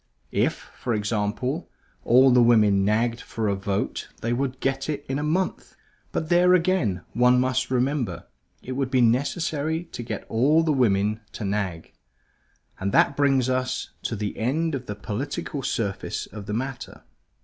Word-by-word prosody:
If - - +2 0.2
(for 120 -3 -1
example) 110 +8 -2 0.3
all 130 +2 +6
the 125 0 +6
women 105 -4 +5
nagged 115 +3 +1
for 110 -1 -3
a 100 - +2
vote 100 +1 -3
they 115 +1 0
would 130 +1 -2
get 135 +1 -1
it 145 -1 -3
in 135 +2 -2
a - - -2
month. 175 +5 -1 0.4
But 160 - -2
there 180 +1 +5
again, 165 - +1
one 125 +1 +4
must 130 0 0
remember, 125 - -1 0.4
it 130 - -7
would 130 0 -1
be 130 -1 +3
necessary 145 +6 +1
to 140 - -8
get 120 - -5
all 145 +8 +3
the 160 -2 +2
women 105 -4 +2
to 105 - -5
nag. 95 -5 -3 0.9
And 100 +1 -1
that 140 - +4
brings 135 -3 +3
us 130 0 -1
to 115 - -3
the 105 -1 -3
end 155 +8 0
of 130 -2 -4
the 105 - -4
political 120 +7 -4
surface 100 -7 -2
of 105 -2 -10
the 105 - -3
matter. 130 +2 -5
125 Hz, 165 wpm, -25 LUFS, 105-140 Hz, 0.9 s, all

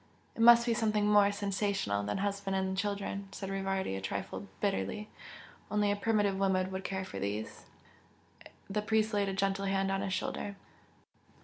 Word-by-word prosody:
"It - - -3
must 235 0 +8
be 235 - +2
something 215 -2 +1
more 205 -1 +5
'sensational' 200 - -1
than 105 0 -2
husband 200 0 -1
and 190 0 0
children!" 200 0 -2
said 195 -1 -5
Rivardi 195 - -1
a 95 - -4
trifle 95 - -4
bitterly 100 - -1 0.6
"Only 210 -1 +2
a - - +1
primitive 205 -2 +1
woman 190 -1 +1
will 190 0 -3
care 190 0 -3
for 100 - -7
these!" 105 +2 -4 1.0
The 210 +2 -1
priest 220 +1 +1
laid 200 -1 +1
a - - -2
gentle 195 0 0
hand 195 0 +1
on 195 0 0
his 195 -1 -2
shoulder. 200 +1 -3
195 Hz, 170 wpm, -32 LUFS, 190-205 Hz, 1.0 s, must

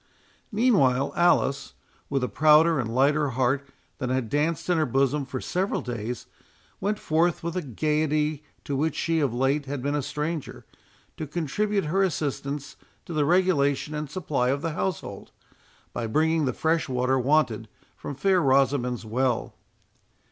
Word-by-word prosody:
Meanwhile, 145 - +3
Alice, 170 -5 +2 0.3
with 135 -2 0
a - - +1
prouder 155 +6 +5
and 120 -3 -2
a - - -5
lighter 145 +4 +2
heart 135 +2 +1 0.3
than 125 - -2
had 130 -3 -1
danced 160 +3 0
in 175 -2 +2
her 155 - +2
bosom 135 +2 +1
for 130 -1 -4
several 185 +8 -1
days, 120 -1 -5 0.5
went 210 +2 -1
forth 165 0 +1
with 170 +1 -3
a 185 - 0
gaiety 150 - 0 0.2
to 145 - -3
which 155 +2 0
she 165 0 0
of 140 -5 +1
late 135 +4 0
had 135 -2 -4
been 145 +1 0
a 145 - 0
stranger, 150 +2 -4 0.5
to 155 - -4
contribute 195 +6 -1
her 185 +6 +1
assistance 145 -5 -2 0.3
to 170 - -7
the 150 -2 +2
regulation 155 -5 +2
and 150 -1 -4
supply 150 -6 -1
of 140 +2 -1
the 165 - -1
household, 185 +2 -4 0.6
by 115 - -3
bringing 160 +5 +2
the 130 - 0
fresh 160 +1 0
water 130 +1 +1
wanted 125 -5 +1 0.3
from 145 - -7
fair 185 +6 +2
Rosamond's 130 -4 +2
well. 120 +2 -1
145 Hz, 160 wpm, -26 LUFS, 130-160 Hz, 0.6 s, prouder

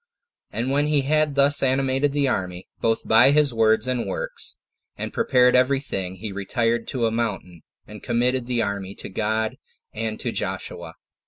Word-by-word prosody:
And 120 +4 -3
when 145 +2 +2
he 150 -2 +2
had 150 +1 +1
thus 140 +1 +5
animated 135 +1 +1
the 145 -1 +1
army, 90 -6 -3
both 115 0 0
by 110 +4 +6
his 145 -2 +3
words 110 0 +3
and 125 -2 -1
works, - - -5 0.4
and - - -5
prepared 125 - +3
every 130 +2 +3
thing, 95 -9 -4
he 105 +2 -6
retired 115 +4 -1
to 125 -4 -1
a 115 - +1
mountain, 95 -7 -3 0.2
and 105 0 -11
committed 125 +1 0
the 120 -2 0
army 100 -1 -4
to - - -8
God 110 +3 -1 0.4
and - - -4
to - - -2
Joshua. - - -4
120 Hz, 170 wpm, -23 LUFS, 110-140 Hz, 0.4 s, by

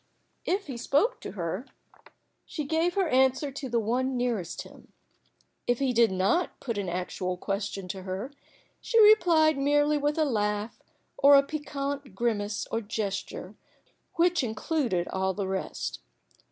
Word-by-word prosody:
If 390 +2 0
he 265 -5 -6
spoke 430 - +1
to - - -7
her, 185 +5 -4 0.8
she 305 - -5
gave 325 +4 +1
her 385 -3 +2
answer 265 +1 +2
to 270 -1 -6
the 235 0 +1
one 250 +4 0
nearest 230 -9 -2
to - - -11
him. - - -18 0.7
If 245 - +2
he 265 -1 0
did 230 -3 +4
not 195 - 0
put 230 -5 -3
an 195 -3 -3
actual 180 +1 -3
question 195 0 -3
to 190 +1 -5
her, 190 +8 -5 0.5
she 460 - +2
replied 340 -9 +6
merely 290 +1 +3
with 295 +1 0
a 315 - +3
laugh 210 -3 -1 0.4
or 285 +1 +8
a 275 - +7
piquant 280 -2 -5
grimace 210 -3 -1
or 225 - 0
gesture, 205 -2 -4 0.6
which 345 -2 +3
included 225 - -1
all 190 0 -1
the 200 -2 -2
rest. 190 0 -3
250 Hz, 155 wpm, -28 LUFS, 205-295 Hz, 0.8 s, or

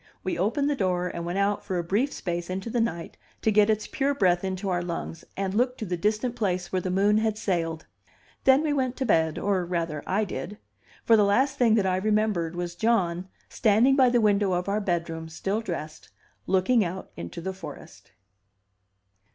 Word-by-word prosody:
We 185 - -1
opened 230 - 0
the 290 - +1
door 180 -5 0
and 170 0 -5
went 175 +2 -2
out 200 +1 +1
for 190 -3 -3
a 175 - -1
brief 215 +11 0
space 175 -1 -4
into 190 +5 -4
the 240 - +1
night 170 -8 -3 0.3
to 220 - +3
get 210 0 +4
its 215 0 +1
pure 280 +1 -1
breath 180 -7 +2
into 190 +1 -3
our 180 -2 0
lungs, 170 -1 -5
and 195 -1 -2
look 250 +4 +1
to 220 - -4
the 180 -2 -2
distant 215 +6 -1
place 185 -6 -1
where 185 - 0
the 185 - -3
moon 200 +3 +3
had 220 -1 0
sailed. 165 -6 -2 0.6
Then 270 +3 +6
we 300 -2 +1
went 260 -3 0
to 265 - -1
bed, 160 -7 +2
or 195 -3 0
rather, 170 -4 -2
I 205 +3 +1
did; 200 +1 -6 0.5
for 230 - +6
the 210 - +5
last 265 +8 +2
thing 230 -3 +5
that 205 -3 +2
I 185 -1 +1
remembered 210 -5 0
was 175 -1 -3
John, 185 -3 0 0.2
standing 230 +5 +3
by 260 -2 +5
the 240 0 +3
window 205 -3 +2
of 180 +1 -1
our 205 +2 0
bedroom 165 -3 -2
still 195 +6 -2
dressed, 155 -7 -6 0.4
looking 195 +5 +3
out 185 +1 -5
into 85 - -7
the 190 +3 -4
forest. 190 - -11
195 Hz, 200 wpm, -26 LUFS, 175-220 Hz, 0.6 s, Then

